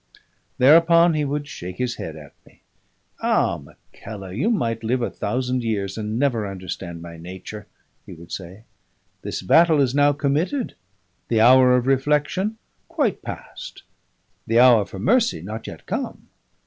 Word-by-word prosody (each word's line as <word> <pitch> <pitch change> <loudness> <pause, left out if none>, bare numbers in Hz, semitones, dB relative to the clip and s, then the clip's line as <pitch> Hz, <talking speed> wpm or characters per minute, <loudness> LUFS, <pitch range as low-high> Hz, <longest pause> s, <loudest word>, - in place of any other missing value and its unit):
Thereupon 165 +5 +6
he 155 -1 0
would 145 +1 -3
shake 90 -11 -8
his 125 -1 -2
head 80 - -6
at 75 -3 -12
me. - - -23 0.6
"Ah! - - +1
Mackellar, 100 -3 -11
you 140 - 0
might 115 - -1
live 120 +2 0
a - - -2
thousand 125 0 -2
years 100 -4 -2
and 110 0 -3
never 120 -6 0
understand 90 -3 -7
my 85 -1 -9
nature," 95 +5 -9 0.4
he - - -9
would 85 0 -13
say. 95 +3 -8 0.6
"This - - -5
battle 160 - +5
is 130 -3 +2
now 145 +1 +4
committed, 150 - -1 0.5
the 115 - +1
hour 125 +2 +6
of 125 -1 +1
reflection 150 - +1 0.3
quite - - -1
past, - - -9 0.6
the 115 - +2
hour 120 -4 +6
for - - -9
mercy 225 - +2
not 110 +6 -7
yet - - -10
come. - - -5
120 Hz, 150 wpm, -22 LUFS, 100-145 Hz, 0.6 s, Thereupon